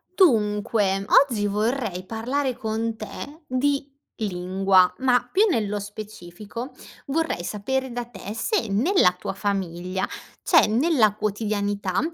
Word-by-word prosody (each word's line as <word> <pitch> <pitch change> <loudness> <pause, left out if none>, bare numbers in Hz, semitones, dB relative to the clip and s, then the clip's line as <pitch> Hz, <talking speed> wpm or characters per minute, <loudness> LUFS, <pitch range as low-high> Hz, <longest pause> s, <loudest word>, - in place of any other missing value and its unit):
Dunque, 210 - +2 0.2
oggi 210 -6 -1
vorrei 210 -2 -1
parlare 250 +5 -2
con 225 +1 -2
te 250 - -8
di 280 +2 0 0.3
lingua, 185 -1 +2
ma 245 -2 +2
più 405 +4 +4
nello 210 - 0
specifico, 210 +3 -8 0.4
vorrei 310 - -1
sapere 260 +7 -2
da 240 0 -4
te 205 -4 -9
se 395 - 0
nella 210 - +3
tua - - -4
famiglia, 190 -2 -2 0.4
c'è 330 - +5
nella 230 -2 +3
quotidianità 205 -2 -1
215 Hz, 115 wpm, -24 LUFS, 195-255 Hz, 0.4 s, c'è